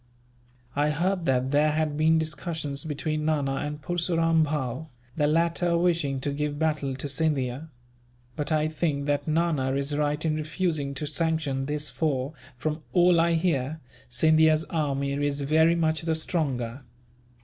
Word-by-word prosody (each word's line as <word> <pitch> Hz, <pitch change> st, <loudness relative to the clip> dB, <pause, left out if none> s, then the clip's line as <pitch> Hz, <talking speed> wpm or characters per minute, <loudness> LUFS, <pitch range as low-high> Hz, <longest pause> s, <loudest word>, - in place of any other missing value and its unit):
"I 145 Hz, +1 st, +2 dB
heard 175 Hz, +3 st, 0 dB
that 130 Hz, 0 st, +1 dB
there 150 Hz, +1 st, +3 dB
had 155 Hz, -1 st, 0 dB
been 160 Hz, +2 st, +3 dB
discussions 155 Hz, -2 st, -3 dB
between 155 Hz, 0 st, -2 dB
Nana 145 Hz, -3 st, 0 dB
and 150 Hz, +1 st, -4 dB
Purseram 165 Hz, -1 st, +1 dB
Bhow, 145 Hz, 0 st, -3 dB, 0.3 s
the 150 Hz, -2 st, +2 dB
latter 170 Hz, +2 st, +2 dB
wishing 170 Hz, -6 st, +1 dB
to 145 Hz, -, -1 dB
give 145 Hz, 0 st, -2 dB
battle 150 Hz, -4 st, 0 dB
to 135 Hz, +2 st, -4 dB
Scindia; 140 Hz, -1 st, -1 dB, 0.7 s
but 150 Hz, +1 st, -2 dB
I 155 Hz, 0 st, +2 dB
think 155 Hz, -2 st, -1 dB
that 145 Hz, 0 st, -1 dB
Nana 155 Hz, -5 st, +1 dB
is 140 Hz, +1 st, -1 dB
right 150 Hz, +1 st, 0 dB
in 155 Hz, -, +2 dB
refusing 155 Hz, -2 st, -2 dB
to 150 Hz, -, -3 dB
sanction 150 Hz, -3 st, -1 dB
this 150 Hz, 0 st, -2 dB
for, 140 Hz, -3 st, -1 dB, 0.2 s
from 155 Hz, +4 st, -3 dB
all 175 Hz, -1 st, +5 dB
I 170 Hz, 0 st, +2 dB
hear, 160 Hz, -3 st, 0 dB, 0.3 s
Scindia's 155 Hz, +4 st, +4 dB
army 140 Hz, -4 st, -1 dB
is 145 Hz, 0 st, -1 dB
very 160 Hz, +4 st, +4 dB
much 160 Hz, -2 st, +1 dB
the 165 Hz, -1 st, 0 dB
stronger." 140 Hz, -7 st, -2 dB
150 Hz, 150 wpm, -26 LUFS, 140-160 Hz, 0.7 s, all